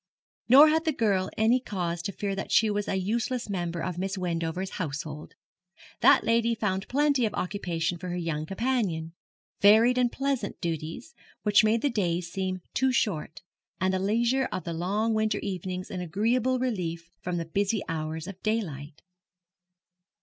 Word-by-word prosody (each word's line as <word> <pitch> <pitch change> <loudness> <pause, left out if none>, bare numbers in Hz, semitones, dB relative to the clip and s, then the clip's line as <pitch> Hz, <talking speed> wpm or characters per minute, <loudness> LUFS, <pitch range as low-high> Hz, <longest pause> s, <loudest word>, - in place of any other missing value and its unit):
Nor 285 +5 +9
had 320 +2 +1
the 320 - +3
girl 200 -6 +1
any 225 +4 +4
cause 175 -8 -3
to 185 - -3
fear 200 +1 -3
that 195 - -5
she 220 -1 +4
was 205 0 -2
a - - 0
useless 230 +6 -1
member 175 -3 -2
of 180 -2 -3
Miss 195 +1 -2
Wendover's 175 +1 -3
household. 150 -1 -5 0.6
That - - +6
lady 230 +1 +2
found 195 -3 -2
plenty 285 -1 +2
of 210 - -6
occupation 175 -3 -2
for 180 +1 -6
her 175 - -3
young 160 -3 -3
companion 195 -7 -1 0.5
varied 225 +5 +6
and 245 -1 +2
pleasant 270 -6 -2
duties, 165 - -4 0.3
which 210 0 +5
made 220 +2 +2
the 285 - +2
days 175 -5 -1
seem 185 -1 -3
too 265 +1 +2
short, 165 -9 -1 0.4
and 185 0 +1
the 190 - +1
leisure 235 +7 +1
of 185 - -3
the 170 - -4
long 205 +7 0
winter 215 -1 +1
evenings 185 -1 -4
an 185 - -4
agreeable 230 +9 +1
relief 175 -9 -3
from 180 -1 -3
the 165 - -2
busy 200 +5 0
hours 160 -1 -3
of 190 0 -9
daylight. 160 -10 -3
195 Hz, 165 wpm, -27 LUFS, 170-230 Hz, 0.6 s, Nor